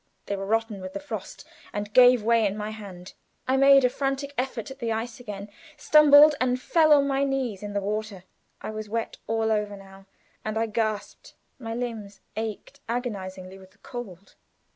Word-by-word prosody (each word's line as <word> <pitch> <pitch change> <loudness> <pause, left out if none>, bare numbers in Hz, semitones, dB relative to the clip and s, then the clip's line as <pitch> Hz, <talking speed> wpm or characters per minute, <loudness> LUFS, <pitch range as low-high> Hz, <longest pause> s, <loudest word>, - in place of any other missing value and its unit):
They 200 - -2
were 195 0 -5
rotten 225 -2 -1
with 185 0 -7
the - - -4
frost 230 -9 -8 0.2
and 205 0 -5
gave 250 -2 +7
way 230 -1 +3
in 200 +1 -4
my 210 0 -4
hand. 195 -4 -10 0.3
I 260 - +2
made 275 0 +6
a - - +4
frantic 275 +1 -2
effort 255 -2 -3
at 265 - -11
the 230 -3 -2
ice 230 +2 -4
again; 205 -4 -7 0.3
stumbled 300 0 +7
and 255 0 +1
fell 310 +3 +3
on 285 -1 +6
my 275 0 +1
knees 265 -7 -2
in 205 -1 -6
the 200 - -1
water. 210 -1 -4 0.4
I - - -4
was 215 -1 -6
wet 230 +1 -3
all 225 0 0
over 210 -1 -1
now, 195 0 -15 0.4
and 215 0 -3
I 225 - +1
gasped. 215 -2 -3 0.2
My 225 -2 -5
limbs 225 -5 -5 0.2
ached 220 +5 -5
agonizingly 195 -6 -5
with 190 0 -17
the - - -29
cold. 230 -9 -9
225 Hz, 185 wpm, -26 LUFS, 205-255 Hz, 0.4 s, gave